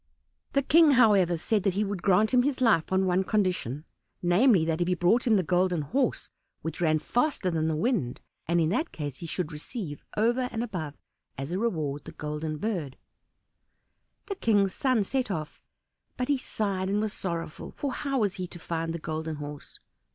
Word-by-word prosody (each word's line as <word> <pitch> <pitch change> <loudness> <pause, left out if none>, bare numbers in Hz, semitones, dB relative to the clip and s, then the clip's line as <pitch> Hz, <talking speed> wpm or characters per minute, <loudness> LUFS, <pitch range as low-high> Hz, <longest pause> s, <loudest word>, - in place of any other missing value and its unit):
The 275 - +2
King, 310 +1 +6
however, 200 -8 +5
said 210 +5 0
that 185 -1 0
he 205 - +2
would 200 -3 -3
grant 200 +5 +3
him 250 - +6
his 270 +1 0
life 220 -11 +3
on 190 0 +3
one 185 +1 +2
condition 180 - -1 0.4
namely, 180 0 +4
if 160 0 0
he 180 - +2
brought 180 +9 +2
him 225 - +5
the 190 - +3
Golden 180 -1 +1
Horse 260 - -1 0.3
which 160 +1 -4
ran 155 -2 +3
faster 245 - 0
than 160 -1 0
the 160 - 0
wind; 160 - 0 0.3
and 170 +1 +2
in 160 -1 +2
that 310 - 0
case 145 -4 -5
he 170 - -7
should 165 -1 -3
receive, 150 - -6
over 240 +4 +2
and 225 - -2
above, 165 -11 -5 0.4
as 135 +4 -5
a 185 - -1
reward, 155 - -2
the - - -9
Golden 150 +1 -4
Bird. 165 -8 -3 1.3
The 400 - -3
King's 205 - +2
son 255 -6 +2
set 255 +4 -1
off, 155 -5 -4 0.6
but 250 +1 -2
he 285 - +3
sighed 195 -6 -2
and 205 +1 +1
was 215 -1 -1
sorrowful, 170 -4 -4
for 280 -2 -2
how 275 -3 -1
was 200 -3 0
he 185 -1 -3
to 175 - -9
find 165 -1 -3
the - - -2
Golden 160 0 -4
Horse? 145 -1 -8
185 Hz, 190 wpm, -28 LUFS, 160-225 Hz, 1.3 s, King